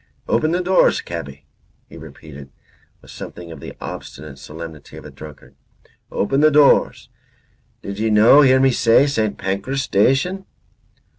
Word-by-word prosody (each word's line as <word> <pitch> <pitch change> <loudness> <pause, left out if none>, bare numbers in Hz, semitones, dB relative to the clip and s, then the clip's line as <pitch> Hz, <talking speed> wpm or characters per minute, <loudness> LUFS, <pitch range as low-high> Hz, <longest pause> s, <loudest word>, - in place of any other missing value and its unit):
"Open 155 - 0
the 180 +2 -1
doors, 185 +1 +2
cabby," 70 +1 -8 0.4
he - - -15
repeated, 70 -3 -13 0.5
with - - -15
something 85 -1 -10
of 80 - -10
the - - -10
obstinate 75 -3 -9
solemnity 80 -1 -11
of - - -12
a - - -11
drunkard, 75 -2 -13 0.6
"open 135 +7 -1
the 155 - +5
doors. 150 -1 +2 0.7
Did 100 +1 -7
ye 110 +1 0
no 110 +7 +6
hear 130 -2 +4
me 135 0 +3
say 120 +2 +3
St. 110 -7 -2
Pancras 100 +9 -3
Station?" 135 - 0
110 Hz, 145 wpm, -19 LUFS, -, 0.7 s, no